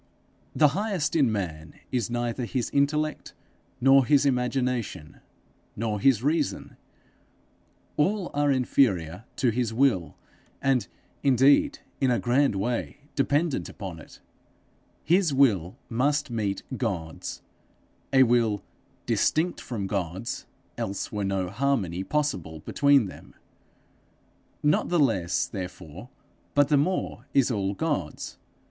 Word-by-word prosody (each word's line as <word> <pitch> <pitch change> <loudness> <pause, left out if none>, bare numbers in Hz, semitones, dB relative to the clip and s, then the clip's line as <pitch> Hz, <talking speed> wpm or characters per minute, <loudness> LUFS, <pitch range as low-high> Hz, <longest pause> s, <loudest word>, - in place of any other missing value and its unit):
The 150 -2 +5
highest 190 -2 -1
in 140 -8 +4
man 80 -7 -4 0.2
is 120 -4 -1
neither 120 +1 -2
his 120 0 -2
intellect 150 +2 0 0.4
nor 135 +2 +6
his 145 +2 +3
imagination 125 - -1 0.6
nor 110 -1 -2
his 120 0 +3
reason; 150 +1 -1 1.2
all 190 +4 +1
are 145 0 +2
inferior 110 - +1
to 125 -4 +2
his 115 -1 -1
will, 115 - +1 0.4
and 135 -3 +1 0.3
indeed, 140 - +4 0.2
in 135 - +2
a 120 - +3
grand 125 0 +2
way, 120 +8 -2
dependent 145 +2 0
upon 95 -6 -7
it: - - -14 0.8
his 175 -4 +3
will 105 -8 +3
must 140 +3 0
meet 105 -4 -2
God's 90 -11 -4 0.7
a 130 -1 +6
will 115 -5 +2 0.4
distinct 170 +3 +1
from 110 -6 -4
God's, 95 +2 -3 0.3
else 100 0 -3
were 105 -1 -2
no 95 -1 -1
harmony 100 -5 -1
possible 95 - -2
between 140 - +3
them. 95 - -11 1.3
Not 150 +1 +2
the 175 - +2
less, 95 - +2
therefore, 90 +1 -8 0.5
but 145 -1 +4
the 150 - +4
more, 145 -5 -1
is 135 -2 +4
all 100 -3 -1
God's. 145 - -3
125 Hz, 115 wpm, -26 LUFS, 100-140 Hz, 1.3 s, nor